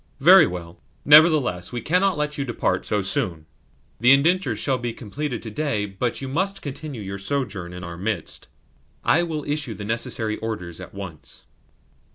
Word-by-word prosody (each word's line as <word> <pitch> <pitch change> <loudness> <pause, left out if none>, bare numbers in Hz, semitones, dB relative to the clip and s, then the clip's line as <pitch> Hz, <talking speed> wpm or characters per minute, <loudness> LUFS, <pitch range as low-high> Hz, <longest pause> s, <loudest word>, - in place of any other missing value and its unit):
"Very 170 +3 +8
well. 85 -1 -7 0.3
Nevertheless 145 - +5
we 120 - -3
cannot 180 - +1
let 150 0 -1
you 140 - -2
depart 120 -3 -1
so 105 -2 0
soon. 85 -4 -1 0.5
The 120 +2 +6
indentures 170 +7 +2
shall 130 -3 0
be 120 -1 -3
completed 125 +3 -5
to 110 - -6
day, 110 -5 -1
but 110 +7 -3
you - - -3
must 190 +8 -1
continue 140 -4 -6
your 100 0 -6
sojourn 100 -5 -3
in 90 +1 -8
our 85 -1 -7
midst. 100 -3 -3 0.6
I 165 - +4
will 160 -3 -3
issue 145 -6 -2
the 100 +1 -7
necessary 110 -1 -1
orders 95 -7 -5
at - - -11
once." 90 -7 -9
120 Hz, 170 wpm, -23 LUFS, 100-150 Hz, 0.6 s, Very